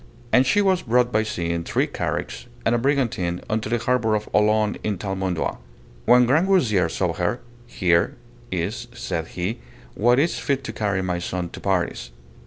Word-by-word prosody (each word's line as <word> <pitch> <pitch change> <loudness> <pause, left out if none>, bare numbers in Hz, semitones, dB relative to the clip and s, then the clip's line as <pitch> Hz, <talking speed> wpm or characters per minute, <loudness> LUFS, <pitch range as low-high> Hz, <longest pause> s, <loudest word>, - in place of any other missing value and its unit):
And 130 +1 +5
she 205 +10 +3
was 190 -2 +2
brought 125 -1 +2
by 110 - +3
sea 85 -6 -2
in 85 0 -2
three - - +1
carricks - - -4 0.2
and - - +3
a 120 - +2
brigantine 115 -10 0
unto 110 0 -1
the 120 - +1
harbour 115 -2 +1
of 105 0 -3
Olone 105 0 +2
in 105 -2 -1
Thalmondois. 95 -3 -2 0.5
When 125 0 +6
Grangousier 135 - +3
saw 90 0 -1
her, 90 +8 -1 0.3
Here 85 -6 +1 0.4
is, 95 +7 -3
said 80 -8 -3
he, 90 +6 -2 0.3
what 120 +3 +3
is 160 +5 +1
fit 140 -2 -1
to 110 - -5
carry 100 -3 -1
my 90 -1 -1
son 90 0 -3
to - - -9
Paris. 90 -9 -1
105 Hz, 175 wpm, -23 LUFS, 90-125 Hz, 0.5 s, When